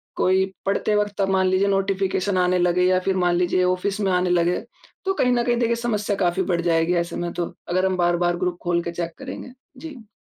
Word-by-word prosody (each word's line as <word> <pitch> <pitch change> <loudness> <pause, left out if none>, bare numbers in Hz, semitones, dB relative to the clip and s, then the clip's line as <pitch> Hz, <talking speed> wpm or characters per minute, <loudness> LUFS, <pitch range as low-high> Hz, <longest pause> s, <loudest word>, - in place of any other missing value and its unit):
कोई 190 +1 +2 0.2
पढ़ते 200 +2 0
वक़्त 205 -1 -1
अब 195 - +1
मान 190 -1 +2
लीजिए 185 +2 +2
नोटिफ़िकेशन 195 0 0
आने 180 0 +2
लगे 180 0 +2
या 185 0 +3
फिर 190 - +2
मान 175 0 +2
लीजिए 180 +1 +1
ऑफ़िस 185 +3 0
में 195 - +1
आने 180 0 +1
लगे 175 0 +2 0.5
तो 385 - +1
कहीं 250 -9 +1
न 240 -1 +1
कहीं 240 0 +1
देखिए 235 -1 +1
समस्या 215 -4 -1
काफ़ी 185 0 +1
बढ़ 175 -2 0
जाएगी 165 0 +1
ऐसे 170 - -8
में 175 0 -3
तो, 175 -1 -4 0.2
अगर 185 +2 +1
हम 190 -1 0
बार-बार 175 0 +1
ग्रुप 180 -1 -2
खोल 175 0 +1
के 170 - -4
चेक 170 0 -4
करेंगे। 265 -1 -8 0.3
जी। 260 -6 -10
185 Hz, 225 wpm, -22 LUFS, 175-200 Hz, 0.5 s, या